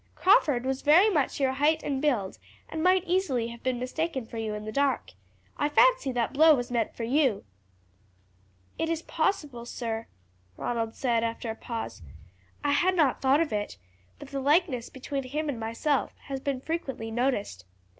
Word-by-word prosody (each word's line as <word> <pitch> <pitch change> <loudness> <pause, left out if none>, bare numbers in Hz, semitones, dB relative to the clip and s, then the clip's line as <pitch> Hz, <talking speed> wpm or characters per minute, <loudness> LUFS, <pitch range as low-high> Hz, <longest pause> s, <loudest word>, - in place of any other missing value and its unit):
Crawford 290 -10 +4
was 265 0 -1
very 350 +9 +6
much 295 -6 0
your 270 -2 +2
height 295 +4 +2
and 270 -2 -2
build, 240 -11 0 0.3
and 320 - -4
might 365 +1 +4
easily 310 -11 0
have 235 0 -10
been 255 -1 -1
mistaken 265 +1 -3
for 230 - -9
you 215 -1 -3
in 210 0 -6
the 215 - -4
dark. 275 - 0 0.5
I 290 - +1
fancy - - +4
that 240 0 -1
blow 315 +2 +7
was 245 -1 -4
meant 235 -3 -1
for 235 - -5
you." 255 -3 +2 1.4
"It 325 - 0
is 330 0 -2
possible, 295 -8 -1
sir," 230 -2 -4 0.5
Ronald 230 -2 -2
said 235 -3 +1
after 230 0 -3
a - - -6
pause. 225 - -6 0.6
"I 290 - +2
had 365 +6 +3
not 305 -7 +2
thought 275 +3 +4
of 315 -8 -1
it; 205 - -3 0.4
but 275 - -11
the 275 -1 -3
likeness 285 -4 +2
between 275 +1 -4
him 295 +4 -3
and 255 -5 -3
myself 230 +6 -1
has 270 -2 -5
been 270 -1 -3
frequently 270 -8 -4
noticed. 225 - -1
265 Hz, 175 wpm, -28 LUFS, 235-305 Hz, 1.4 s, blow